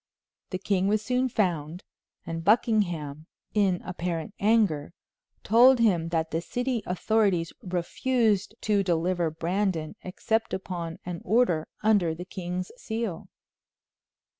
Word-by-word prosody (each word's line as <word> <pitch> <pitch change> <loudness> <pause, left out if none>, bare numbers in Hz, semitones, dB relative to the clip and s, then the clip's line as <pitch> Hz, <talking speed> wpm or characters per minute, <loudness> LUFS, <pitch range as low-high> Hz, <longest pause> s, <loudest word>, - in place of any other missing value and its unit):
The 185 - -2
king 190 0 0
was 215 +1 +1
soon 255 +2 +1
found, 175 -6 -1 0.4
and 165 0 -4
Buckingham, 175 -8 +1 0.3
in 195 -4 +2
apparent 175 0 -4
anger, 200 -9 +2 0.5
told 245 +5 +6
him 180 -8 +2
that 165 -1 -1
the 165 - -1
city 245 +4 -2
authorities 185 -2 +1
refused 205 +4 0
to 210 -2 +2
deliver 175 -1 +1
Brandon 170 0 -1
except 220 +4 -1
upon 175 -3 -5
an 175 -1 -5
order 185 -7 +2 0.2
under 200 -7 +3
the 175 +2 -7
king's 180 -1 -5
seal. 220 -8 -4
185 Hz, 115 wpm, -27 LUFS, 170-215 Hz, 0.5 s, told